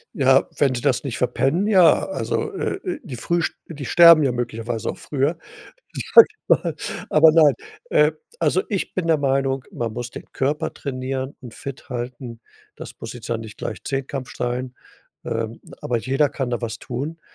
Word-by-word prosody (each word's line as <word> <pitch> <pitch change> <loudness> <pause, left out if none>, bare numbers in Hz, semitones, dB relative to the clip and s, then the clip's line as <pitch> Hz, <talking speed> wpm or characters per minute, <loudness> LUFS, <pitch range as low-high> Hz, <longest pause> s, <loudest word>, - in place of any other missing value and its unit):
Ja, 135 -4 +4
wenn 135 -3 +2
Sie 120 - -3
das 135 -2 +1
nicht 125 -4 -3
verpennen, 135 - +1
ja. 185 -7 +5
Also, - - -2
äh, - - -2
äh, 355 -5 -3
die 135 - -7
früh 170 +8 0
sch - - -1
die 150 -5 -7
sterben 170 -3 +8
ja 130 -3 +1
möglicherweise 115 -1 -3
auch - - -5
früher, 145 +3 -1 0.8
sage 460 - +11
ich 430 - -26
mal. - - +2 0.3
Aber 155 +1 +7
nein, 155 -4 +6 0.4
äh, 150 +1 +4 0.3
also - - +2
ich 200 -3 -2
bin 180 -3 -2
der 160 - +4
Meinung, 135 -2 0
man 115 -2 -3
muss 120 +2 -5
den - - -10
Körper 150 +4 -1
trainieren 130 0 -4
und 120 -3 -10
fit 140 +1 -9
halten. 120 -1 -6 0.4
Das - - -9
muss 115 - -6
jetzt 120 -2 -9
ja 115 - -1
nicht 110 -2 -9
gleich - - -6
Zehnkampf 135 -1 -4
sch - - -12
sein. 125 +1 -2 0.5
Ähm, 115 0 -3 0.2
aber 120 - -1
jeder 135 +5 +1
kann 130 -3 -3
da 120 0 -2
was 115 -1 -4
tun. 140 +6 -5
135 Hz, 185 wpm, -22 LUFS, 120-150 Hz, 0.8 s, sage